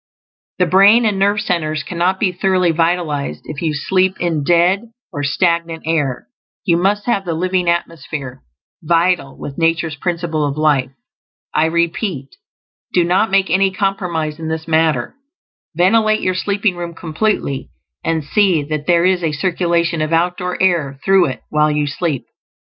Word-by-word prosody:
The 180 Hz, -, +3 dB
brain 200 Hz, +6 st, +5 dB
and 205 Hz, -3 st, 0 dB
nerve 200 Hz, +1 st, +2 dB
centers 155 Hz, -4 st, -1 dB
cannot 180 Hz, +4 st, -1 dB
be 190 Hz, -, +1 dB
thoroughly 185 Hz, -1 st, +1 dB
vitalized 165 Hz, -, -1 dB
if 155 Hz, -2 st, -7 dB
you 155 Hz, -3 st, -1 dB
sleep 190 Hz, +5 st, +1 dB
in 165 Hz, -4 st, -1 dB
"dead" 175 Hz, +7 st, +2 dB, 0.3 s
or 145 Hz, -, -3 dB
stagnant 170 Hz, +2 st, 0 dB
air; 150 Hz, -6 st, -1 dB, 0.4 s
you 170 Hz, -4 st, +3 dB
must 195 Hz, +4 st, +1 dB
have 200 Hz, -5 st, 0 dB
the 170 Hz, -3 st, -3 dB
living 180 Hz, +1 st, 0 dB
atmosphere, 155 Hz, -, -4 dB, 0.4 s
vital 170 Hz, -3 st, +1 dB
with 140 Hz, +1 st, -7 dB
nature's 165 Hz, -1 st, +1 dB
Principle 165 Hz, 0 st, -2 dB
of 145 Hz, 0 st, -2 dB
Life. 145 Hz, -4 st, +2 dB, 0.6 s
I 155 Hz, -, +3 dB
repeat, 170 Hz, -, -1 dB, 0.6 s
do 175 Hz, -, +4 dB
not 185 Hz, +6 st, +2 dB
make 195 Hz, -3 st, +2 dB
any 195 Hz, +2 st, +3 dB
compromise 180 Hz, -6 st, -2 dB
in 160 Hz, -, -5 dB
this 160 Hz, 0 st, -4 dB
matter; 160 Hz, -6 st, +1 dB, 0.6 s
ventilate 215 Hz, +4 st, +3 dB
your 185 Hz, -, 0 dB
sleeping 200 Hz, +1 st, 0 dB
room 170 Hz, -1 st, -6 dB
completely, 160 Hz, -4 st, -2 dB, 0.3 s
and 165 Hz, -1 st, -1 dB
see 180 Hz, -1 st, +2 dB
that 150 Hz, 0 st, -4 dB
there 170 Hz, 0 st, +3 dB
is 185 Hz, -1 st, +2 dB
a 155 Hz, -2 st, 0 dB
circulation 170 Hz, 0 st, 0 dB
of 155 Hz, +1 st, -1 dB
outdoor 180 Hz, +2 st, 0 dB
air 160 Hz, -8 st, +1 dB
through 195 Hz, -3 st, +4 dB
it 130 Hz, -2 st, -5 dB
while 150 Hz, 0 st, +2 dB
you 150 Hz, 0 st, 0 dB
sleep. 145 Hz, -1 st, -2 dB
170 Hz, 155 wpm, -17 LUFS, 155-185 Hz, 0.6 s, brain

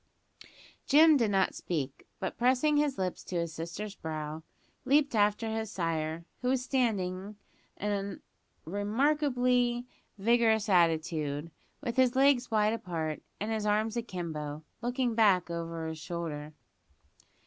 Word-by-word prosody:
Jim 310 Hz, +2 st, +7 dB
did 235 Hz, -6 st, +2 dB
not 195 Hz, -1 st, +2 dB
speak; 145 Hz, -6 st, -4 dB
but 190 Hz, -, -3 dB
pressing 260 Hz, +5 st, +3 dB
his 290 Hz, -2 st, +1 dB
lips 185 Hz, -2 st, -2 dB
to 185 Hz, -, -6 dB
his 170 Hz, -1 st, -1 dB
sister's 170 Hz, +6 st, -5 dB
brow, 155 Hz, -3 st, -5 dB, 0.4 s
leaped 280 Hz, +1 st, +3 dB
after 210 Hz, +1 st, +2 dB
his 220 Hz, -1 st, -2 dB
sire, 165 Hz, -2 st, -2 dB, 0.2 s
who 250 Hz, -, -2 dB
was 260 Hz, -1 st, +1 dB
standing 205 Hz, -7 st, -1 dB, 0.4 s
an 200 Hz, -1 st, -2 dB, 0.5 s
a -, -, -36 dB
remarkably 245 Hz, -, +1 dB, 0.3 s
vigorous 225 Hz, 0 st, +3 dB
attitude, 160 Hz, -3 st, +1 dB, 0.3 s
with 245 Hz, -3 st, -4 dB
his 255 Hz, -1 st, +4 dB
legs 265 Hz, -2 st, +4 dB
wide 215 Hz, -1 st, +2 dB
apart 165 Hz, -8 st, -3 dB, 0.2 s
and 210 Hz, +2 st, -2 dB
his 215 Hz, -1 st, -1 dB
arms 215 Hz, +2 st, +1 dB
akimbo, 160 Hz, -9 st, -4 dB, 0.2 s
looking 245 Hz, 0 st, 0 dB
back 195 Hz, -6 st, +3 dB
over 165 Hz, -1 st, -4 dB
his 160 Hz, 0 st, -5 dB
shoulder. 155 Hz, -3 st, -5 dB
205 Hz, 130 wpm, -30 LUFS, 165-245 Hz, 0.5 s, Jim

